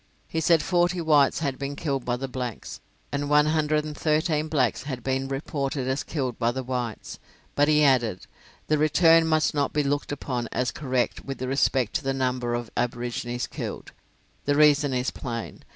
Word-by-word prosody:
He 160 - -2
said 165 -1 +4
forty 175 0 +1
whites 150 -3 +3
had 140 -4 -2
been 140 0 -4
killed 140 -4 -2
by 120 - 0
the 135 +2 -4
blacks, 125 -3 -6 0.3
and 145 0 -2
one 150 0 +5
hundred 155 -1 +1
and 150 -1 -6
thirteen 155 0 +1
blacks 135 -7 +1
had 130 -4 -6
been 135 +1 -1
reported 135 -1 -3
as 130 +2 0
killed 130 -6 -3
by 115 -1 +2
the 130 +1 -4
whites; 125 -3 -4 0.3
but 145 0 +3
he 150 0 +4
added, 120 -9 +2 0.4
"the 155 -1 +1
return 165 +2 +5
must 155 -1 +2
not 145 -2 0
be 150 - +1
looked 145 +1 -1
upon 125 -4 -3
as 125 -2 0
correct 130 -3 -1
with 135 -1 -6
respect 130 -2 +1
to 160 - -10
the 135 0 -1
number 125 -2 -1
of 120 -2 -5
aborigines 120 0 -2
killed." - - -6 0.5
The 145 - +2
reason 150 -1 +5
is 125 0 -1
plain. 115 -4 -6
140 Hz, 185 wpm, -25 LUFS, 125-150 Hz, 0.5 s, one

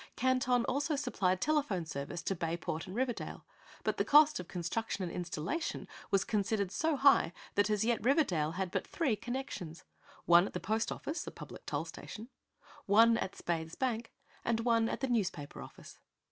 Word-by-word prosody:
Canton 255 -1 +2
also 285 +4 0
supplied 195 -10 0
telephone 280 - +1
service 155 +3 -5
to 195 - 0
Bayport 165 0 -3
and 185 - -7
Riverdale, 245 -1 -3 0.4
but - - 0
the - - +2
cost 300 +1 +6
of 180 - -7
construction 190 +4 -3
and 170 - -4
installation 175 - -3 0.2
was 195 -1 +3
considered 205 -2 0
so 315 +9 +1
high 275 -10 +5 0.2
that 205 +1 +2
as 210 0 +1
yet 235 -3 +1
Riverdale 185 - +2
had 185 0 -2
but - - -2
three 280 -10 0
connections: 230 -8 -5 0.4
one 175 +2 +6
at - - -9
the - - -2
post 220 +3 -1
office, 310 +4 -4
a - - -4
public - - -11
toll - - -1
station; 225 +3 -9 0.6
one 225 +3 +6
at 190 - -3
Spaythe's 165 -1 -3
bank 235 -3 -2 0.3
and 230 -1 +1
one 230 -1 +3
at - - -3
the 265 - +1
newspaper 190 - -2
office. - - -12
215 Hz, 175 wpm, -33 LUFS, 180-255 Hz, 0.6 s, cost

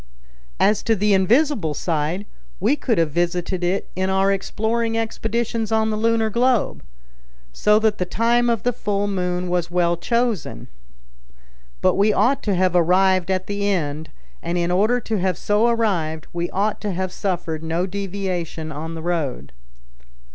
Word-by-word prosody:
As 210 0 +3
to 225 - +1
the 210 +1 +2
invisible 200 - +2
side, 165 +5 -2 0.3
we 220 +10 +2
could 250 -6 -1
have 165 -2 +2
visited 175 +2 -1
it 185 +3 0
in 190 +1 0
our 190 +1 +2
exploring 225 +4 -1
expeditions 225 0 -2
on 220 0 +2
the - - -1
lunar 225 0 +1
globe. 245 +1 +1 0.7
So 210 - +3
that 215 -1 +1
the 180 - 0
time 235 +5 +2
of 230 -3 0
the 245 - +1
full 205 -3 -1
moon 180 -2 -1
was 175 -1 -1
well 175 -1 +2
chosen. 230 - -2 1.1
But 185 - +4
we 205 +2 +3
ought 265 +6 +2
to 205 -3 +1
have 180 0 +1
arrived 185 +1 +3
at 185 -1 0
the 205 0 -2
end; 155 -5 -2 0.3
and 170 +1 -2
in 175 0 0
order 215 +7 +3
to 220 -2 -2
have 185 -1 0
so 210 +3 +2
arrived, 180 -10 0
we 175 0 -2
ought 205 +2 -1
to 205 -2 -2
have 185 +1 -2
suffered 175 -5 -3
no 165 +2 -1
deviation 185 -5 -4
on 160 +3 -6
the 160 - -7
road." 155 - -2
190 Hz, 160 wpm, -22 LUFS, 175-220 Hz, 1.1 s, But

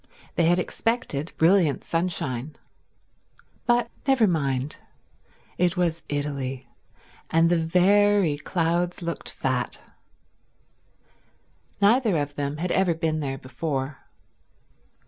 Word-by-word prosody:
They 170 - +2
had 175 +2 +4
expected 180 - -2
brilliant 165 -3 +3
sunshine. 155 -5 -2 1.1
But 240 -1 +2 0.2
never 265 -4 +5
mind: 140 -6 -1 0.8
it 180 0 +2
was 165 -2 0
Italy, 135 -3 -3 0.6
and 165 +1 +3
the 170 -2 +2
very 185 -1 +3
clouds 175 +2 -1
looked 170 0 -4
fat. 130 -2 -2 2.0
Neither 215 -2 +4
of 145 -1 -2
them 145 0 -3
had 175 +3 -2
ever 185 -3 +2
been 160 -1 -1
there 135 -2 -3
before. 135 0 -4
165 Hz, 100 wpm, -25 LUFS, 145-180 Hz, 2.0 s, never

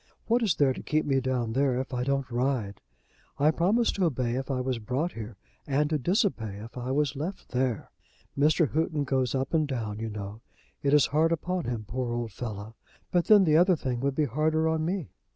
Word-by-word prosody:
What 235 +2 +2
is 205 -9 +2
there 140 -3 +3
to - - -8
keep 155 0 0
me 135 -2 +2
down 125 -3 -1
there 130 -1 +2
if 130 +1 -5
I 125 0 -1
don't 135 -1 -1
ride? 120 -5 -1 0.6
I 150 +2 +4
promised 205 +9 +2
to 190 - +2
obey 125 -6 0
if 130 +2 -3
I 135 -2 0
was 125 -1 -1
brought 130 +10 -2
here, 110 - -8 0.3
and 145 +2 +1
to 155 - +1
disobey 140 - 0
if 110 +3 -10
I 125 0 -4
was 145 +1 +1
left 165 +8 -5
there. 125 -3 -1 0.4
Mr. 150 +1 +3
Houghton 155 -1 0
goes 130 -2 0
up 135 +3 -2
and 155 -2 +2
down, 110 -6 -3
you 115 0 -3
know. 105 +1 -7 0.4
It 140 +1 +3
is 145 - +6
hard 160 +3 +2
upon 175 +1 -1
him, 115 -3 -3
poor 125 0 -2
old 120 -2 -3
fellow. 110 0 -6 0.4
But 175 -1 +2
then 210 -2 +7
the 155 -3 +4
other 180 +2 +5
thing 130 -5 -3
would 140 +1 -1
be 155 - +2
harder 155 +5 +1
on 160 0 0
me. 175 -1 -2
135 Hz, 215 wpm, -28 LUFS, 120-155 Hz, 0.6 s, then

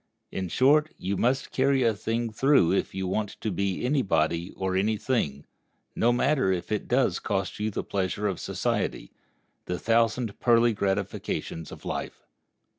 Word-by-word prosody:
In 95 -2 -3
short, 150 - +4
you 100 +2 -2
must 130 +6 0
carry 135 0 +2
a 115 -2 +3
thing 115 +2 -2
through 135 - +4
if 95 - -1
you 95 0 -2
want 105 +2 -2
to 110 - -2
be 100 +3 -1
any 140 +2 +2
body 85 -3 0
or 95 -1 -1
any 105 +3 +1
thing, 100 - -1 0.5
no 120 - +3
matter 130 -3 +2
if 90 +1 -3
it 105 - -1
does 125 +1 +2
cost 100 -2 -2
you 105 +1 0
the 105 - -3
pleasure 100 +1 -2
of 95 -4 -1
society, - - -2 0.5
the 90 - -2
thousand 115 +1 +1
pearly 120 -1 +4
gratifications 95 -5 -3
of - - -11
life. - - -5
105 Hz, 165 wpm, -27 LUFS, 95-120 Hz, 0.5 s, short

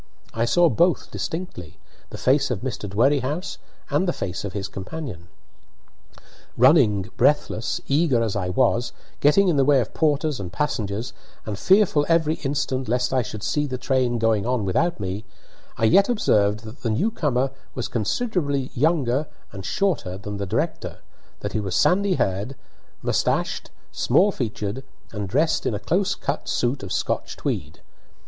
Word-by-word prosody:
I 115 +1 +1
saw 175 +8 +4
both 170 +6 +2
distinctly 160 - -5 0.3
the - - -8
face 135 +3 +2
of 115 -6 -2
Mr. 110 -5 -4
Dwerrihouse 135 - 0 0.3
and 190 - +2
the 175 - +1
face 90 0 -4
of 100 -2 -5
his 100 -1 -3
companion. 100 - -7 1.3
Running, 115 - +4
breathless, 125 -5 +1
eager 140 -5 +2
as 110 -3 -2
I 95 -3 -1
was, 120 +4 +1 0.3
getting 190 +7 +5
in 165 -5 +2
the 135 - +5
way 140 0 +5
of 115 - -3
porters 150 -3 +1
and 90 -3 -5
passengers, 110 -5 -2 0.3
and 105 - -3
fearful 190 -7 +4
every 160 -2 +3
instant 135 -2 -2
lest 125 +2 +1
I 130 - +3
should 110 -2 -6
see 150 0 0
the 130 -2 -3
train 125 -1 +1
going 110 -3 +2
on 125 -2 0
without 140 - +1
me, 95 +2 -4 0.5
I - - -4
yet 195 - +5
observed 105 - +2
that 110 +2 -11
the 115 - -1
new 155 - +1
comer 135 - 0 0.2
was 125 - -2
considerably 140 - -1
younger 145 -1 +1 0.2
and 95 -2 -8
shorter 165 - -1
than 105 +1 -6
the 100 -1 -3
director, - - -2 0.4
that - - -4
he - - 0
was 100 -3 -3
sandy 195 +1 +3
haired, 100 - -1 0.5
mustachioed, - - 0 0.2
small 185 +11 +3
featured, 110 - -4 0.3
and 105 -3 -4
dressed 160 - +1
in 110 - 0
a - - -3
close 185 - 0
cut 140 - -3
suit 125 +3 0
of 95 - -7
Scotch - - -2
tweed. - - -4
130 Hz, 160 wpm, -23 LUFS, 105-150 Hz, 1.3 s, getting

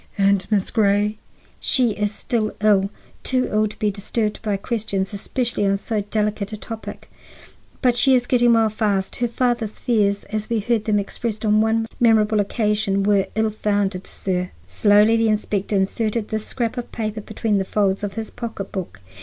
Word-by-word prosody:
"And 195 -1 +2
Miss 205 -3 +1
Grey?" 210 0 +2 0.4
"She 250 -4 +2
is 205 0 -1
still 215 0 -2
ill, 205 -2 +3 0.3
too 255 -1 0
ill 215 0 +2
to 210 - -9
be 210 -2 +1
disturbed 210 +2 -2
by 210 -2 -1
questions, 200 -2 -2
especially 235 +2 -2
on 195 0 +2
so 215 +1 -2
delicate 210 0 -2
a 215 - -5
topic. 225 +1 -8 0.8
But 250 -2 +4
she 260 +2 +4
is 245 -1 +2
getting 240 -1 +4
well 225 -1 +4
fast. 205 -3 -1
Her 240 - +1
father's 235 -2 -1
fears 205 -4 +1
as 215 0 -4
we 230 - +1
heard 220 0 0
them 215 -2 +2
expressed 215 +2 -3
on 215 0 +4
one 225 +1 +1
memorable 220 -2 +4
occasion 205 -1 +1
were 200 -1 +3
ill 220 0 +1
founded, 205 -3 -1
sir." 180 -1 -2 0.2
Slowly 210 +2 +4
the 225 -1 +2
inspector 210 -1 -1
inserted 210 +3 0
this 215 0 -2
scrap 235 -1 -2
of 240 - -7
paper 215 -1 -3
between 215 -1 -1
the - - 0
folds 195 0 0
of 200 -2 -3
his 220 +1 -4
pocketbook. 195 - -6
215 Hz, 175 wpm, -22 LUFS, 200-225 Hz, 0.8 s, But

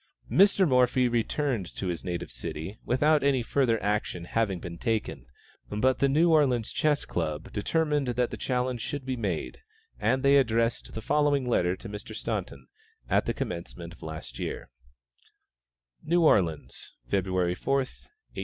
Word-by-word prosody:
Mr. 195 -1 +5
Morphy 125 -1 +3
returned 120 - -1
to - - -4
his 85 -3 -3
native 90 -1 -4
city 80 - -6
without 150 +4 +3
any 135 -3 +2
further 115 -2 +1
action 100 -4 -1
having 100 -2 0
been 85 0 -7
taken, 110 - -2 0.4
but 125 +5 +1
the 140 - +3
New 165 +5 +4
Orleans 130 -8 +3
Chess 150 -2 +1
Club 80 -3 -3
determined 150 +5 0
that 125 0 0
the - - -3
challenge 125 -2 -1
should 145 +1 -4
be 130 -1 -2
made, 100 -9 -3 0.4
and 130 +1 +1
they 140 +1 +6
addressed 115 -3 +1
the 110 - -5
following 145 -1 +2
letter 90 -6 +2
to 115 - -10
Mr. 105 -1 -8
Staunton, 70 -2 -4 0.5
at - - +2
the - - +1
commencement 85 0 -5
of - - -18
last 80 -6 -8
year: - - -5 1.3
NEW 170 +1 +2
ORLEANS, 80 - +1
February 90 +3 0
4, 135 +9 -1
1858. 140 - -6
120 Hz, 155 wpm, -28 LUFS, 90-140 Hz, 1.3 s, they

